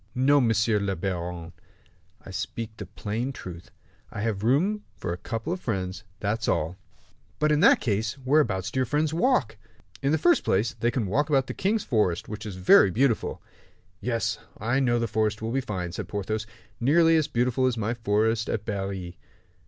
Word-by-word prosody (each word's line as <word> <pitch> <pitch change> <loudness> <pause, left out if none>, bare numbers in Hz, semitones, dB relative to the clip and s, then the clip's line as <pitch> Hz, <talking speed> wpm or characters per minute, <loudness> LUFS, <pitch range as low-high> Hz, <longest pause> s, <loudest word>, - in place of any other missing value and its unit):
"No, 140 +3 +4
monsieur 115 -2 +2
le 100 -1 -1
baron, 85 -2 -4 0.7
I - - -8
speak 115 -1 -5
the 105 - -7
plain 110 +6 -3
truth. 90 -8 -9 0.4
I - - -6
have 105 -3 -1
rooms 175 - +2 0.2
for 85 - -3
a - - -5
couple 115 - -3
of 185 - -5
friends, 95 -3 -3 0.2
that's 110 +3 -1
all." 80 +4 0 0.6
"But 150 0 +2
in 150 - +3
that - - +6
case, 110 +2 -1
whereabouts 130 - +1
do 130 - -1
your 130 - +1
friends 150 +4 0
walk?" 165 - +1 0.4
"In 140 - +1
the 160 - +3
first 345 - +3
place, 110 +7 +1
they 120 - 0
can 120 -3 -1
walk 140 +11 0
about 135 -3 +3
the - - -5
king's 205 +3 0
forest, 105 -8 0
which 105 +1 -6
is 100 - -6
very 95 +1 +6
beautiful." 115 +4 0 0.6
"Yes, 115 +1 -1 0.2
I 120 +5 0
know 120 -3 +2
the 115 0 0
forest 110 0 0
is 110 - -5
very 130 +4 0
fine," 95 -8 -4
said - - -5
Porthos; 110 +2 -3 0.3
"nearly 165 +6 +4
as 155 -2 +2
beautiful 125 0 +1
as 125 -2 0
my 110 +1 -1
forest 110 0 +1
at 110 -1 -2
Berry." 95 -3 -4
115 Hz, 185 wpm, -26 LUFS, 100-135 Hz, 0.7 s, that